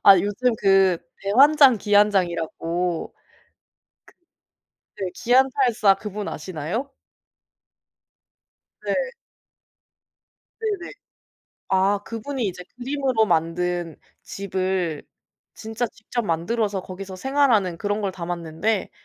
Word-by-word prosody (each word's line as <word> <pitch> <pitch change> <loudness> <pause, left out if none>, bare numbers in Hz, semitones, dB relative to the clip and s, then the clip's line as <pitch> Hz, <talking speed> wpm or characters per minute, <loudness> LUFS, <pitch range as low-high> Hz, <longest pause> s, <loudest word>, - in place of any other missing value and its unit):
아 195 -2 +8
요즘 225 +5 0
그 195 -3 +4 0.2
대환장 270 +3 +6
기안장이라고 180 -4 +1 1.8
크 195 - -5
네, 180 - -3
기안84 245 -4 +3
그분 210 -1 -5
아시나요? 185 - -4 1.9
네. - - -1 1.7
네네. 410 -4 -3 0.8
아 195 +2 +3
그분이 235 +1 -4
이제 180 -1 -5
그림으로 260 -2 0
만든 170 -1 -1 0.3
집을 185 -5 -2 0.5
진짜 225 +2 -3
직접 230 +2 -5
만들어서 195 +4 -1
거기서 190 0 -8
생활하는 245 -8 +2
그런 205 +1 -1
걸 195 -2 -2
담았는데 175 +3 -2
200 Hz, 195 characters per minute, -23 LUFS, 180-235 Hz, 1.9 s, 아